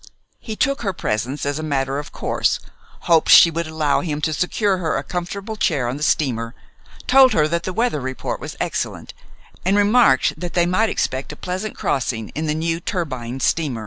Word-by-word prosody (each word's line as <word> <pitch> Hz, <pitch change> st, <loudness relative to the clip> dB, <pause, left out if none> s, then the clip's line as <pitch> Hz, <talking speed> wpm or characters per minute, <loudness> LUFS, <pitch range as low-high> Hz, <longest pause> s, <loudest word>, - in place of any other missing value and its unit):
He 220 Hz, -, -6 dB
took 275 Hz, +4 st, 0 dB
her 195 Hz, -4 st, -1 dB
presence 125 Hz, 0 st, -2 dB
as 145 Hz, +1 st, -2 dB
a -, -, -3 dB
matter 140 Hz, -2 st, -1 dB
of 145 Hz, -, -8 dB
course, -, -, 0 dB, 0.4 s
hoped 165 Hz, -2 st, +3 dB
she 170 Hz, -, +9 dB
would 165 Hz, 0 st, -3 dB
allow 155 Hz, -2 st, 0 dB
him 150 Hz, -4 st, -3 dB
to 155 Hz, +1 st, 0 dB
secure 190 Hz, +4 st, 0 dB
her 160 Hz, -3 st, -1 dB
a -, -, -3 dB
comfortable 195 Hz, +4 st, -5 dB
chair 150 Hz, -, 0 dB
on 125 Hz, +3 st, -3 dB
the -, -, -10 dB
steamer, 120 Hz, -6 st, 0 dB, 0.5 s
told 265 Hz, 0 st, +6 dB
her 150 Hz, -1 st, +3 dB
that 170 Hz, +2 st, -2 dB
the 185 Hz, -, -2 dB
weather 225 Hz, -, 0 dB
report 130 Hz, 0 st, -4 dB
was -, -, -8 dB
excellent, -, -, -3 dB, 0.5 s
and 195 Hz, +3 st, +2 dB
remarked 205 Hz, -, +4 dB
that 175 Hz, -1 st, -5 dB
they 175 Hz, -1 st, +4 dB
might 185 Hz, +6 st, +2 dB
expect 130 Hz, +3 st, -2 dB
a -, -, -8 dB
pleasant 185 Hz, +6 st, -5 dB
crossing 120 Hz, -5 st, -2 dB
in 155 Hz, +1 st, -4 dB
the 150 Hz, -, 0 dB
new 165 Hz, +1 st, -1 dB
turbine 130 Hz, -8 st, -4 dB
steamer. 145 Hz, -7 st, 0 dB
160 Hz, 195 wpm, -21 LUFS, 140-185 Hz, 0.5 s, she